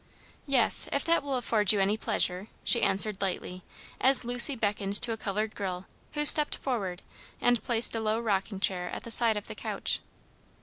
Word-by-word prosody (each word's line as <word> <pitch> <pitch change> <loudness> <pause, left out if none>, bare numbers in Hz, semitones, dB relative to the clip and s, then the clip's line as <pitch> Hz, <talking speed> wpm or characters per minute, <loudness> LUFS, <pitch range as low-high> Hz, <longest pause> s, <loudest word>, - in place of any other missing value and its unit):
"Yes, 265 -4 +6
if 280 - -4
that 335 0 0
will 275 -1 -6
afford 220 -5 0
you 210 - -2
any 195 +2 -2
pleasure," 190 -3 -4 0.2
she 235 - +4
answered 200 +1 -2
lightly, 185 -1 -7 0.4
as 265 -1 +3
Lucy 245 +3 +4
beckoned 205 -3 -2
to 240 - -1
a - - -4
colored 215 0 -6
girl, 185 -2 -8 0.3
who 295 0 -4
stepped 300 0 +9
forward 200 -9 -7 0.4
and 245 -3 -1
placed 230 0 0
a - - -4
low 220 0 -4
rocking 200 -3 -5
chair 180 -2 -4
at - - -10
the 230 - -9
side 225 -2 +2
of 205 - -9
the - - -11
couch. - - -4
220 Hz, 185 wpm, -25 LUFS, 195-245 Hz, 0.4 s, stepped